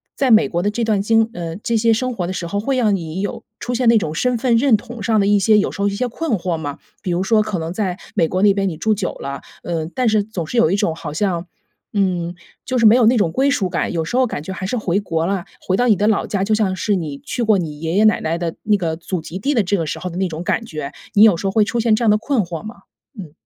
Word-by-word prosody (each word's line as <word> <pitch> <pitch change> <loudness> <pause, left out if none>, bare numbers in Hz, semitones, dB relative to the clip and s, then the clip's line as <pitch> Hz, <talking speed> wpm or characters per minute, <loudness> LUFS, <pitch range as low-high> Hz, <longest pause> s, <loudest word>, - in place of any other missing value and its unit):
在 270 -3 +1
美 220 0 +6
国 175 - -1
的 205 - +1
这 230 +3 -2
段 215 -3 +1
经 225 +2 +3
呃， 170 -1 -5
这 230 +3 -2
些 225 +1 +3
生 255 +3 0
活 185 -6 -3
的 - - -3
时 180 -2 -4
候， 200 +4 -2
会 265 +5 -1
让 215 -5 +3
你 170 0 -4
有 205 - -4 0.2
出 245 - -3
现 245 -1 +2
那 230 - +6
种 160 -7 -2
身 245 +9 0
份 240 0 +2
认 235 -1 +4
同 235 +1 -10
上 220 +1 +2
的 200 - +2
一 205 0 +4
些 215 +2 +4
有 205 - +1
时 - - -6
候 200 - +2
一 200 - -1
些 250 +4 -1
困 285 +4 -3
惑 175 -1 -2
吗？ 145 -3 -5 0.2
比 185 - -3
如 175 +2 0
说 215 +2 +3
可 210 -3 -2
能 165 +1 -4
在 185 -3 -2 0.2
美 165 - +3
国 185 +3 -1
那 205 -1 +6
边 195 -1 0
你 160 - -6
住 220 +7 +1
久 195 -3 -2
了， 140 0 -5 0.2
呃， 165 -2 -3
但 255 -2 +1
是 215 -2 +3
总 200 -5 -5
是 240 - -4
有 195 - +5
一 - - +2
种 165 -5 0
好 160 -2 -6
像， 175 +1 -1 0.5
嗯， 180 -4 0 0.3
就 255 - -1
是 230 - +3
没 215 +2 +8
有 245 -2 +4
那 245 +2 +4
种 185 -7 +2
归 270 +9 +2
属 225 -9 +1
感， 175 - -1
有 165 -2 -1
时 200 - -4
候 255 0 +3
感 145 - -5
觉 190 - -5
还 190 - -5
是 250 - -1
回 195 -3 0
国 165 -5 -2
了， 190 -1 -2
回 185 - -1
到 245 +4 +2
你 215 - +5
的 205 +3 +1
老 215 -2 +1
家， 195 -2 -1
就 210 +2 +1
像 210 -3 +1
是 205 +2 0
你 155 -6 -4
去 - - -5
过 220 -3 +3
你 155 -5 -4
爷 165 +1 -3
爷 205 +3 +3
奶 215 0 +4
奶 165 +1 -1
的 170 -1 -3
那 210 -1 +3
个 165 -4 -2
祖 170 +1 -4
籍 175 +4 -7
地 280 +9 0
的 225 - +3
这 195 +2 0
个 165 - -1
时 - - -3
候 180 - -5
的 170 - -7
那 190 0 +1
种 165 0 -6
感 230 - -1
觉。 155 -8 -6 0.2
你 205 - +6
有 215 -5 +7
时 190 +4 -3
候 - - 0
会 215 +2 +4
出 235 +3 -2
现 225 -1 +3
这 235 - -2
样 225 - +4
的 210 - +4
困 245 +1 +1
惑 170 -2 -6
吗？ 215 +2 -8 0.4
嗯。 175 -7 -8
200 Hz, 330 characters per minute, -19 LUFS, 175-225 Hz, 0.5 s, 没